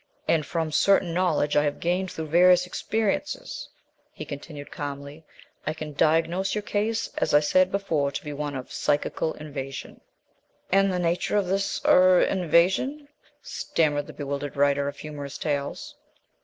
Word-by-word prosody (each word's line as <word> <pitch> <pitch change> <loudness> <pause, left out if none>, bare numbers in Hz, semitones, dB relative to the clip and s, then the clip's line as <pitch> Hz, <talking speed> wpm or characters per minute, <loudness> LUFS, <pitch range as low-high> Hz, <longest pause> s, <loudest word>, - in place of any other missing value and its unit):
"And 160 -2 +3
from 165 -2 -2
certain 180 +1 +3
knowledge 165 -5 +1
I 145 - +4
have 145 -1 -1
gained 180 +2 0
through 160 - -5
various 180 +2 +5
experiences," 220 +8 -2 0.4
he - - -8
continued 145 0 -8
calmly, 145 +1 -6 0.4
"I 155 - -1
can 155 -1 -7
diagnose 165 +6 +1
your 210 - -2
case 220 +2 -1
as - - +2
I - - +8
said 185 +5 +3
before 160 -8 0
to - - -4
be 150 - -5
one 145 0 -4
of 130 -1 -7
psychical 150 +2 0
invasion." 140 -3 -7 0.7
"And 195 +1 +4
the 180 - -1
nature 175 +3 0
of 200 - +2
this 195 +2 -1
er 185 0 +6
invasion?" 190 - +1 0.3
stammered 145 -3 -1
the - - -10
bewildered 140 0 -4
writer 140 0 +2
of 140 0 -5
humorous 145 -2 -7
tales. 145 -2 -3
160 Hz, 155 wpm, -26 LUFS, 145-185 Hz, 0.7 s, I